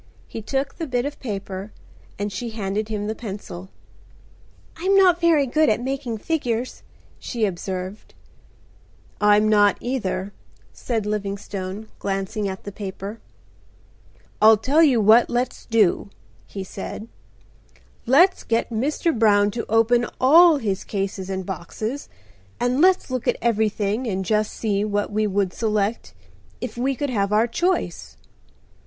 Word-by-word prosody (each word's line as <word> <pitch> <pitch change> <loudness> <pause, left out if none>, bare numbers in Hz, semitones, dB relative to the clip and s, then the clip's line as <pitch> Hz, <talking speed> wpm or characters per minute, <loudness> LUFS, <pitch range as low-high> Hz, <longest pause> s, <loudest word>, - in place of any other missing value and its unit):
He 225 - -7
took 270 - -3
the 325 - -3
bit 250 -1 -1
of 290 - -5
paper 200 -3 -5 0.5
and 205 0 -3
she 240 +2 -4
handed 215 0 -3
him 210 -1 -3
the 215 - -2
pencil. 195 -5 -8 1.1
"I'm 375 +4 +1
not 360 -3 +5
very 325 -4 +4
good 305 +4 +2
at 215 - +2
making 260 -2 -3
figures," 250 -3 -2 0.4
she 230 -3 -1
observed. 190 +1 -5 1.1
"I'm 210 +1 +5
not 205 -1 +4
either," 205 -6 -3 0.4
said 225 -4 -3
Livingstone, 200 -1 -4
glancing 195 +1 -2
at 190 0 -7
the 205 - -6
paper. 200 +2 -7 1.2
"I'll 220 +1 +8
tell 275 +9 +2
you 275 -7 +5
what 220 +3 +5
let's 245 +1 -2
do," 215 -3 +2 0.4
he 195 - -6
said. 200 +3 -7 1.0
"Let's 345 +10 +5
get 230 +1 -1
Mr. 290 +8 0
Brown 205 -2 +4
to 230 +2 -5
open 230 +2 +3
all 320 +5 +7
his 205 -7 -2
cases 195 -1 -4
and 190 -1 -3
boxes, 215 - -5 0.5
and 245 +3 +1
let's 370 -6 +3
look 255 -2 -3
at - - +2
everything 220 0 0
and 190 -3 -2
just 215 +2 +1
see 205 -2 -1
what 205 -1 -1
we 215 +1 +1
would 195 -2 0
select 215 0 -1 0.4
if - - -5
we 265 +3 0
could 285 0 -2
have 200 -3 0
our 215 +2 +4
choice?" 350 +10 -2
215 Hz, 140 wpm, -23 LUFS, 200-250 Hz, 1.2 s, I'll